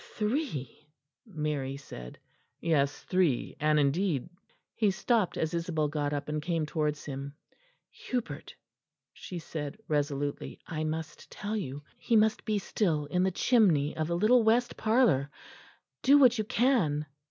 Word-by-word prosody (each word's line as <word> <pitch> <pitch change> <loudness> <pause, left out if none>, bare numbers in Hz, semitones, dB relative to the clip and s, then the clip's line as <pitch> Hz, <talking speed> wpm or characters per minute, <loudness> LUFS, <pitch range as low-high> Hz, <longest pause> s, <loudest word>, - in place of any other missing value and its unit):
"Three?" 210 - -3 0.4
Mary 150 -6 -3
said. 60 - -10 0.4
"Yes, 145 -4 +1
three 180 -9 +1
and 150 0 +3
indeed 150 +1 +1 0.2
" - - -39
He 215 -3 +2
stopped 215 0 +1
as 160 +1 -1
Isabel 165 -3 -1
got 145 -1 -1
up 145 -1 -3
and 150 0 -2
came 165 -1 -1
towards 150 -1 -2
him. 140 0 -6 0.6
"Hubert," 250 -2 -5 0.6
she 180 - -8
said 155 0 -5
resolutely, 145 -1 -2
"I 155 -2 -3
must 160 +1 -5
tell 210 +1 -4
you. 145 -8 -4 0.2
He 235 - +1
must 220 0 +3
be 215 -2 +1
still 170 -7 0
in 180 +5 0
the 190 - +3
chimney 180 - +3
of 155 -1 -1
the 170 0 0
little 230 +6 +5
west 235 +2 +2
parlour. 215 - +3 0.7
Do 280 +3 +6
what 255 -4 +5
you 215 - 0
can." 205 - +2
160 Hz, 145 wpm, -29 LUFS, 145-215 Hz, 0.7 s, Do